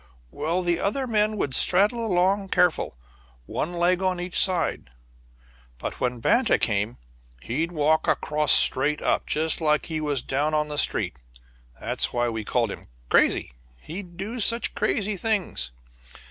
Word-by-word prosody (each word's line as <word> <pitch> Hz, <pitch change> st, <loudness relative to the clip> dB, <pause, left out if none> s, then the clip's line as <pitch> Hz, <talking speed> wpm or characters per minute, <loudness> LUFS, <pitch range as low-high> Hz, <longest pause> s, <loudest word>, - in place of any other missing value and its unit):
Well, 165 Hz, +5 st, -2 dB
the 175 Hz, -1 st, 0 dB
other 260 Hz, +7 st, -1 dB
men 215 Hz, -2 st, 0 dB
would 140 Hz, -9 st, -2 dB
straddle 205 Hz, -, +3 dB
along 195 Hz, 0 st, +1 dB
careful, 180 Hz, -, +1 dB, 0.5 s
one 170 Hz, -, -4 dB
leg 175 Hz, +1 st, +1 dB
on 185 Hz, -1 st, -1 dB
each 180 Hz, 0 st, -6 dB
side, 175 Hz, -, +1 dB, 0.9 s
but -, -, -6 dB
when 125 Hz, -1 st, -2 dB
Banta 235 Hz, -, +2 dB
came 105 Hz, +1 st, -1 dB, 0.5 s
he'd 165 Hz, -, -2 dB
walk 155 Hz, -1 st, +1 dB
across 150 Hz, 0 st, +1 dB
straight 150 Hz, +3 st, +6 dB
up, -, -, 0 dB
just 160 Hz, +2 st, +1 dB
like 150 Hz, -1 st, +1 dB
he 155 Hz, -2 st, -4 dB
was 145 Hz, -4 st, -1 dB
down 150 Hz, +3 st, -1 dB
on 150 Hz, 0 st, 0 dB
the 150 Hz, -, -5 dB
street. -, -, 0 dB, 0.6 s
That's -, -, -1 dB
why 120 Hz, 0 st, 0 dB
we 110 Hz, -1 st, -4 dB
called 115 Hz, 0 st, -1 dB
him -, -, -10 dB, 0.2 s
'Crazy' -, -, +2 dB, 0.3 s
he'd 175 Hz, -, -9 dB
do 220 Hz, +6 st, -5 dB
such 230 Hz, +2 st, +1 dB
crazy 210 Hz, -1 st, -1 dB
things. 200 Hz, -, -1 dB
170 Hz, 150 wpm, -24 LUFS, 145-195 Hz, 0.9 s, straight